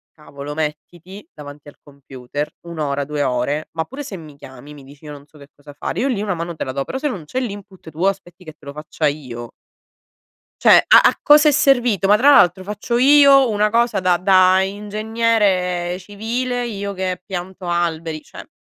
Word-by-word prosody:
cavolo, 145 -1 -9
mettiti 170 - -7
davanti 145 0 -12
al 145 - -13
computer 140 0 -7 0.2
1 170 -1 -8
ora, 140 -1 -2
2 150 +1 -4
ore, 130 +4 -2
ma 160 - -2
pure 265 - -9
se 205 - -7
mi 155 -5 -12
chiami 140 +2 -13
mi 140 -2 -14
dici: 140 +2 -17
"Io 150 - -9
non 145 -1 -12
so 150 +1 -21
che 140 0 -16
cosa 145 0 -15
fare", 145 - -5
io 265 - 0
lì 235 -7 -2
una 200 -3 -2
mano 170 0 -6
te - - -4
la 130 - -5
do; 135 +1 -4
però - - -5
se 295 +2 -2
non 185 - -7
c'è 255 +12 -4
l'input, 200 -6 -8
tu 155 +2 -9
aspetti 185 -2 -4
che 155 - -10
te 150 - -22
lo 140 - -7
faccia 150 +1 -3
io, 125 -5 -6 1.0
cioè - - +6
a - - +8
a - - -7
cosa 300 +1 +6
è - - +3
servito? 245 - +2
Ma 205 +1 +5
tra 275 +6 +5
l'altro 185 - +4
faccio 210 +4 -3
io 275 -1 +6
una 210 0 +1
cosa 235 -1 +1
da 180 -1 +2
da 185 0 +4
ingegnere 205 -3 -1
civile, 235 +6 -4
io 200 -3 -5
che 185 -1 -4
pianto 185 0 -7
alberi, 165 -2 -2
cioè - - -13
180 Hz, 205 wpm, -19 LUFS, 150-210 Hz, 1.0 s, a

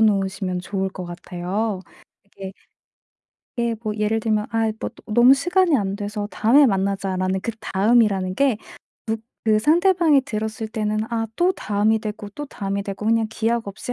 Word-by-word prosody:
놓으시면 195 -3 +1
좋을 190 +1 -2
것 185 -1 -7
같아요. 180 +4 -3 0.4
이게 195 -1 -9 1.1
예 235 -1 0
뭐 215 -1 -2
예를 215 +1 0
들면 215 -1 0
아 225 -1 +1
뭐 - - -3
또 - - -18
"너무 240 +4 +7
시간이 350 +2 +2
안 195 -3 -1
돼서 205 0 -4
다음에 270 +7 +5
만나자."라는 190 -3 0
그다음이라는 205 -3 +1
게 275 -1 +3 0.9
무 220 - +3
그 215 - +5
상대방이 330 - +4
들었을 220 -1 -4
때는 215 -1 -1
아 225 -1 -1
또 360 +2 +3
다음이 215 - +1
되고 210 -1 -6
또 295 +8 -7
다음이 200 -5 -3
되고 200 +1 -6
그냥 225 0 +3
기약 225 0 -1
없이 200 +5 -5
215 Hz, 320 characters per minute, -22 LUFS, 195-230 Hz, 1.1 s, 너무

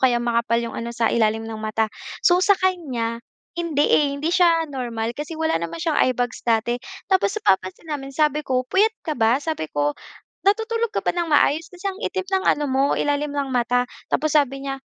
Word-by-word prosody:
kaya 255 -2 +4
makapal 235 -1 +1
'yong 235 -1 -2
ano 230 - -4
sa 235 -1 0
ilalim 225 -1 +1
ng 220 -1 -6
mata. 220 0 -1 0.3
So 355 0 +5
sakanya, 330 - +1 0.4
hindi 310 -4 +1
eh, 295 - +4
hindi 310 +4 -1
siya 340 -2 +4
normal 235 -3 -3
kasi 295 +4 -6
wala 320 - 0
naman 170 0 -4
siyang - - +1
eyebags 245 -1 0
dati 235 +1 0 0.3
tapos 385 +2 +2
napapansin 190 - 0
namin, 270 -2 -4
sabi 300 +1 +1
ko, 255 -3 -1
"Puyat 425 - +2
ka 315 - -1
ba?" 230 -3 +3
Sabi 295 - -3
ko, 145 0 0 0.6
"Natutulog 450 +1 0
ka - - -1
ba - - +2
ng 345 -1 -2
maayos? 310 +1 +3
Kasi 365 +2 -5
ang 385 - -13
itim 380 -4 -2
ng 380 0 -1
ano 295 - -2
mo, 265 +1 +2
ilalim 290 0 0
ng 275 -2 -2
mata." 245 0 +2 0.2
Tapos 310 -1 0
sabi 275 -2 +1
niya, 270 0 -4
275 Hz, 195 wpm, -22 LUFS, 235-330 Hz, 0.6 s, So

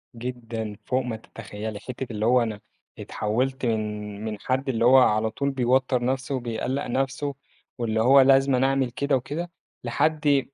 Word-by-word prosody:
جدًا، 115 -3 -5
فوق 130 0 +1
ما 120 -2 -3
تتخيّلي. 110 -1 -7
حتّة 125 +4 -6
اللي 105 0 -2
هو 125 +2 +4
أنا 110 -3 -4 0.4
اتحوّلت 130 +6 -2
من 105 -2 -3
من 105 -2 -4
حد 130 +5 -1
اللي 115 -2 +1
هو 130 +2 +7
على 110 -3 +4
طول 140 +4 -1
بيوتّر 130 -1 +1
نَفسه 130 +2 -1
وبيقلّق 125 +3 -3
نَفسه، 135 +2 -2 0.4
واللي 110 -2 0
هو 135 +4 +7
لازمًا 135 -1 +4
أعمل 135 -2 0
كده 140 +3 0
وكده، 155 +7 -4 0.3
لحد 150 -3 +1
125 Hz, 155 wpm, -25 LUFS, 110-135 Hz, 0.4 s, هو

